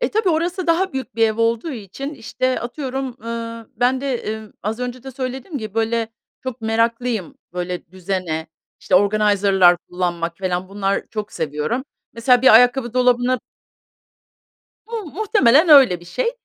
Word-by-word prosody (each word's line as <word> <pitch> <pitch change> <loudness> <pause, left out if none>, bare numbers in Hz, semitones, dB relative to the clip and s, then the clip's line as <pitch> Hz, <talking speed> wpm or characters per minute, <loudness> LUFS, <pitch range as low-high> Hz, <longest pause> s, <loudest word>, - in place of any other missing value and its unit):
E, - - 0
tabii 430 -2 +1
orası 345 +2 0
daha 360 +3 +2
büyük 265 -2 -5
bir 225 - 0
ev 220 - -3
olduğu 230 +6 0
için, 260 - -7
işte, 255 +1 -2
atıyorum, 260 0 -4
ııı, 230 0 -6
ben 250 +3 +2
de, 275 -1 -1
emm, 220 -1 -6
az 215 +3 -3
önce 250 0 -4
de 265 - -8
söylediğim 265 +4 -5
gibi, 215 -3 -7
böyle, 225 0 0 0.3
çok 260 -2 -5
meraklıyım, 230 -2 -1 0.2
böyle, 180 0 -4
düzene, 180 -3 -3 0.3
işte, - - 0
organizer'lar 200 -2 +4
kullanmak 170 -2 -2
falan 185 -1 -2
bunlar 195 0 -1
çok 215 -2 -5
seviyorum. 155 - -2 0.3
Mesela 245 +1 +3
bir 265 - +7
ayakkabı 245 0 +4
dolabına 250 0 +3 1.5
Mu 455 -2 -5
muhtemelen 340 - +3
öyle 265 - +7
bir - - -14
şey. 470 - -1
230 Hz, 150 wpm, -20 LUFS, 200-265 Hz, 1.5 s, bir